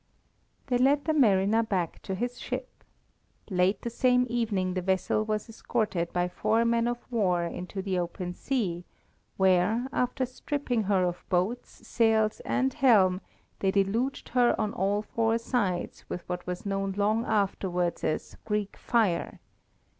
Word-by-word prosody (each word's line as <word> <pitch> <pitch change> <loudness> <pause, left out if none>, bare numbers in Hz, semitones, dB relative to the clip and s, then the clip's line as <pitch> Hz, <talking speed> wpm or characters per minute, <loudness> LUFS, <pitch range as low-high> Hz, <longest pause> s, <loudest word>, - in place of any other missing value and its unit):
They 250 -3 +1
led 280 +3 +3
the 315 - +2
mariner 215 -5 +4
back 190 -7 -2
to 190 - -4
his 245 +5 -3
ship. - - -6 0.7
Late 185 +2 +2
the 235 - -3
same 250 +1 +3
evening 205 -6 0
the 185 - -1
vessel 190 +3 +1
was 215 0 -2
escorted 215 -6 -2
by 175 0 0
four 225 +5 +1
men 230 0 +2
of 240 0 -1
war 185 -7 +2
into 180 +3 -5
the 190 -2 -1
open 175 +1 -4
sea, 185 -9 -2 0.5
where, 190 +5 +3
after 250 +1 0
stripping 255 -2 -2
her 190 -2 +2
of 175 -1 -2
boats, 190 +7 -2
sails, 220 -2 +2
and 260 0 +1
helm, 195 -9 +4 0.4
they 195 - +1
deluged 215 +8 0
her 245 -1 +3
on 215 -2 -1
all 200 +3 0
four 225 +1 +1
sides 210 -7 -2
with 180 - -6
what 180 0 -5
was 180 +2 -4
known 195 -1 -1
long 215 +3 +2
afterwards 190 -5 0
as 155 - -2
Greek 210 -2 -2
fire. 215 -8 0
210 Hz, 150 wpm, -28 LUFS, 185-235 Hz, 0.7 s, mariner